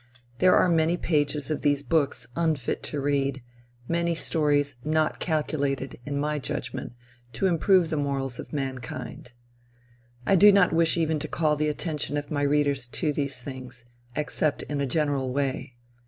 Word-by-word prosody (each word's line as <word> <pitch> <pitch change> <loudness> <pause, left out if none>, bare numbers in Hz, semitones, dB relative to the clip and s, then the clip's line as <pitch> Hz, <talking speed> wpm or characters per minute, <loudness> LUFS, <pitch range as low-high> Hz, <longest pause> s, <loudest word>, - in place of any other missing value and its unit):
There 185 0 +5
are - - +4
many 165 0 +2
pages 150 -3 0
of 155 - -2
these 145 -1 +1
books 140 -3 0
unfit 160 -7 0
to 150 - -2
read, 140 -2 0 0.4
many 170 0 0
stories 145 -3 +2
not 155 0 0
calculated, 140 -5 -1
in 140 -1 -2
my 150 +1 -1
judgment, 130 -4 -4 0.4
to 115 - -1
improve 180 -1 +3
the 155 - 0
morals 135 -3 -1
of - - -8
mankind. 130 -3 -5 0.9
I 195 - +4
do 205 +3 +8
not 200 -4 +4
wish 165 +1 +3
even 160 -2 +1
to 155 - -3
call 155 -1 +1
the 150 +1 0
attention 150 -2 -1
of 145 -1 -5
my 145 -1 -1
readers 145 -2 +1
to 150 +4 -1
these 140 -3 -2
things, 130 -2 -8 0.3
except 150 0 -1
in 145 -1 -3
a 140 - 0
general 140 -2 0
way. 135 -1 -2
145 Hz, 160 wpm, -26 LUFS, 140-160 Hz, 0.9 s, do